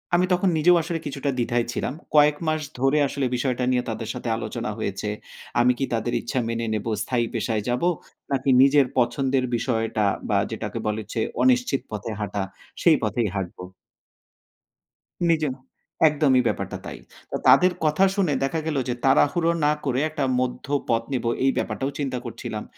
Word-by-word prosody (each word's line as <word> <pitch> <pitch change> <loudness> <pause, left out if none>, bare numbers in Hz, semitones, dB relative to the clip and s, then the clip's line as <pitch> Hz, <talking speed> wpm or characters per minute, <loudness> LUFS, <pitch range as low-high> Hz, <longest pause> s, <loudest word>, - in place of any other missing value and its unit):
আমি 180 +1 +4
তখন 180 +1 +2
নিজেও 175 +3 +5
আসলে 165 0 -3
কিছুটা 140 0 -3
দ্বিধায় 120 -1 0
ছিলাম। 125 - -2 0.2
কয়েক 150 0 +6
মাস 155 0 +1 0.2
ধরে 135 +3 +3
আসলে 140 0 -2
বিষয়টা 125 0 -1
নিয়ে 125 -1 +1
তাদের 115 0 -4
সাথে 120 - -5
আলোচনা 120 0 -4
হয়েছে। 105 -1 -3 0.5
আমি 120 +1 +5
কি 135 - +1
তাদের 115 +1 -1
ইচ্ছা 130 - -2
মেনে 115 0 -2
নেব 105 -1 -2 0.2
স্থায়ী 120 -2 0
পেশায় 110 -3 -1
যাব? 125 +1 0 0.5
নাকি 135 0 0
নিজের 140 +1 +6
পছন্দের 130 +2 +1
বিষয়টা 115 -3 0 0.2
বা - - +3
যেটাকে - - -4
বলে 105 +1 -1
হচ্ছে 110 +2 -4 0.2
অনিশ্চিত 250 - +3
পথে 105 +1 -4
হাঁটা, 100 -1 -2 0.4
সেই 165 -3 +5
পথেই 110 0 0
হাঁটব। 95 -3 -4 1.7
নিজে 160 -2 +2 0.6
একদমই 145 -4 +3
ব্যাপারটা - - -2
তাই। - - -7 0.3
তো - - -2
তাদের 185 0 +7
কথা 155 +5 +4
শুনে 185 -7 +1
দেখা 150 +4 0
গেল 155 -3 -1
যে - - +1
তাড়াহুড়ো 150 +5 +3
না 150 - +4
করে 130 -2 +1
একটা 155 -2 -3 0.2
মধ্য 125 -1 -2 0.2
পথ 115 0 +2
নিব, 125 - -2 0.2
এই 135 - +4
ব্যাপারটাও 135 +1 -2
চিন্তা 135 -3 -2
করছিলাম। 120 - -5
130 Hz, 165 wpm, -24 LUFS, 115-150 Hz, 1.7 s, তাদের